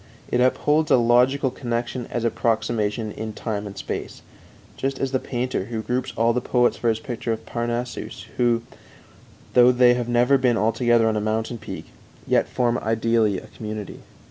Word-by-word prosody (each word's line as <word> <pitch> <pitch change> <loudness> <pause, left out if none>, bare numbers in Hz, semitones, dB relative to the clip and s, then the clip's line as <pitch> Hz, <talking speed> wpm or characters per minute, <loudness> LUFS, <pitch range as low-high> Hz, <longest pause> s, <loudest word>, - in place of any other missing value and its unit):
It 125 - +2
upholds 150 +4 +2
a - - +6
logical 125 +3 +3
connection 120 0 -3
as 120 - -3
approximation 110 -2 0
in 110 +1 -6
time 105 -2 -4
and 100 -1 -10
space, - - -5 0.5
just 135 0 -2
as 135 -1 -2
the 130 - +1
painter, 125 -6 -2
who 110 0 -4
groups 125 +4 -2
all 115 +1 +3
the 125 - 0
poets 125 0 +2
for 120 - 0
his 110 - +1
picture 115 -1 -4
of 110 0 -4
Parnassus 120 +1 -4
who, 120 -1 +2 0.9
though 125 0 +7
they 125 0 +5
have 120 -1 -2
never 125 +3 +4
been 125 -3 +2
all 110 +1 +2
together 120 0 +3
on 110 -1 +1
a - - 0
mountain 110 +2 -2
peak, - - -8 0.3
yet - - +2
form 120 -1 +1
ideally 110 -2 +1
a 110 - -8
community. 110 -2 -7
120 Hz, 175 wpm, -23 LUFS, 110-125 Hz, 0.9 s, though